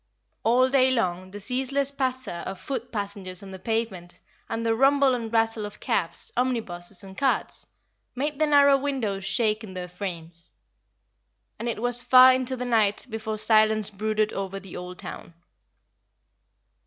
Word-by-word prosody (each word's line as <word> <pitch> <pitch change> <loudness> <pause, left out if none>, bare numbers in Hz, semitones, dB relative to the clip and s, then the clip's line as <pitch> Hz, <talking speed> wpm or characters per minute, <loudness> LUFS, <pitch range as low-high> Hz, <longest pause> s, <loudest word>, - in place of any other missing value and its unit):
All 245 +3 +4
day 260 -1 +4
long 185 -7 -1
the 205 +2 -8
ceaseless 265 +5 0
patter 255 -9 -2
of 190 - -6
foot 240 +4 -5
passengers 200 -3 -3
on 195 - -9
the 190 - -8
pavement, 200 -5 -3 0.3
and 225 0 -3
the 225 - +3
rumble 270 +2 +4
and 230 -3 -3
rattle 225 -1 +1
of 205 0 -8
cabs, 170 -4 -1
omnibuses, 205 -7 -2
and 190 -1 -11
carts, 270 +3 -1 0.5
made 290 +3 -2
the 310 - +3
narrow 280 -1 +6
windows 230 -9 -2
shake 215 +1 +1
in 190 -3 -9
their 180 -1 -5
frames. 170 -2 -7 1.1
And 235 - -2
it 230 - -3
was 245 +1 +3
far 255 +1 +8
into 260 0 -1
the 250 - -3
night 220 -4 +2
before 220 0 -4
silence 215 -1 +3
brooded 215 +1 -1
over 195 0 -4
the 195 -2 -11
old 180 0 -7
town. 170 - -9
220 Hz, 155 wpm, -25 LUFS, 195-255 Hz, 1.1 s, far